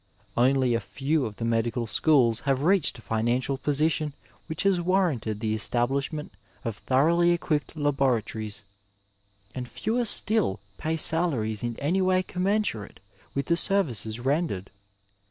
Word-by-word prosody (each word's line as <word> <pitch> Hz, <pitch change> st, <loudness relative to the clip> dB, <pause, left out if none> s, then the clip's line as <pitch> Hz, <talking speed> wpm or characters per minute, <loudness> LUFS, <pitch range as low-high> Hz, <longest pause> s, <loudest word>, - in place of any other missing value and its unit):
Only 130 Hz, 0 st, +3 dB
a 115 Hz, -, +1 dB
few 135 Hz, +8 st, -1 dB
of 105 Hz, -, -9 dB
the 115 Hz, -, -4 dB
medical 115 Hz, +1 st, 0 dB
schools 120 Hz, 0 st, +3 dB
have 135 Hz, 0 st, +1 dB
reached 185 Hz, -5 st, +3 dB
a 115 Hz, -, -14 dB
financial 120 Hz, +4 st, -1 dB
position 150 Hz, 0 st, 0 dB, 0.3 s
which 160 Hz, +3 st, -2 dB
has 195 Hz, -3 st, +2 dB
warranted 170 Hz, -, 0 dB
the 110 Hz, -1 st, 0 dB
establishment 135 Hz, +7 st, -1 dB, 0.3 s
of 115 Hz, -3 st, -2 dB
thoroughly 165 Hz, -, +2 dB
equipped 155 Hz, -4 st, -1 dB
laboratories, 115 Hz, -7 st, -1 dB, 0.9 s
and 125 Hz, -1 st, -6 dB
fewer 235 Hz, +3 st, -1 dB
still 210 Hz, -, +3 dB, 0.2 s
pay 160 Hz, +1 st, -1 dB
salaries 135 Hz, -, +1 dB
in 120 Hz, -1 st, -3 dB
any 170 Hz, +7 st, 0 dB
way 185 Hz, 0 st, +2 dB
commensurate 185 Hz, -, -2 dB, 0.4 s
with 140 Hz, 0 st, -1 dB
the 170 Hz, -, +2 dB
services 125 Hz, -, +1 dB
rendered. 135 Hz, -, -1 dB
135 Hz, 135 wpm, -26 LUFS, 115-170 Hz, 0.9 s, Only